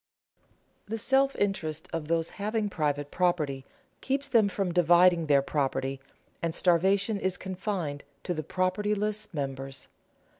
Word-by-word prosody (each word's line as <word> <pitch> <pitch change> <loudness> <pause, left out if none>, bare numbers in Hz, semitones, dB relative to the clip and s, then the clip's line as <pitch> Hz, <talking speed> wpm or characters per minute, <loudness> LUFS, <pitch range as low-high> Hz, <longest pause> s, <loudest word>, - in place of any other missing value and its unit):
The 225 +2 -3
self 270 +4 +2
interest 160 -6 -2
of 165 -2 -3
those 165 0 0
having 210 0 -2
private 145 -3 -1
property 155 -7 0 0.4
keeps 275 +1 -1
them 230 -6 +4
from 195 -2 -1
dividing 175 -1 +5
their 140 -2 +4
property, 135 -2 -1 0.4
and 165 -1 -1
starvation 195 +4 +2
is 190 -1 -1
confined 185 -6 -4 0.2
to 180 - -1
the 155 - -3
propertyless 205 +5 -1
members. 135 -3 -4
180 Hz, 125 wpm, -28 LUFS, 150-205 Hz, 0.4 s, dividing